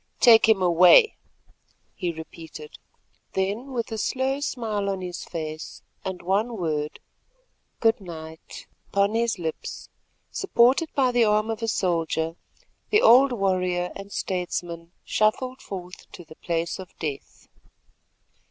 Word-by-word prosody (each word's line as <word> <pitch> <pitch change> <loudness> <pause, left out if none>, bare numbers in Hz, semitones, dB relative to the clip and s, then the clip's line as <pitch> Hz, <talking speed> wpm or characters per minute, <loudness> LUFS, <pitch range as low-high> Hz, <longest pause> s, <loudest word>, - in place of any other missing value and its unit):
"Take 225 -2 +7
him 200 -4 +4
away," 180 - +7 0.8
he 175 - -2
repeated. 160 -1 -10 0.5
Then, 205 +8 -2
with 235 -2 -3
a 220 - -3
slow 265 +5 0
smile 220 -8 -2
on 195 -1 -2
his 180 -1 -5
face 155 -2 -6 0.2
and 190 -1 -5
one 210 +6 0
word, 155 -4 -2 0.8
"Good 225 -2 +3
night," 160 -3 -10 0.2
upon 200 +1 +1
his 230 -1 +1
lips, 160 -3 -5 0.4
supported 275 -3 +3
by 260 -3 +3
the 240 -2 +4
arm 215 +1 +2
of 225 +1 -5
a 225 - -1
soldier, 165 -5 0 0.5
the 425 +1 +4
old 260 +4 +7
warrior 185 -4 0
and 195 0 -9
statesman 175 -3 -3
shuffled 255 +5 0
forth 180 -2 -9
to 175 - -10
the 155 - -13
place 170 +1 -2
of 185 -2 -11
death. 145 -4 -6
190 Hz, 130 wpm, -25 LUFS, 170-230 Hz, 0.8 s, Take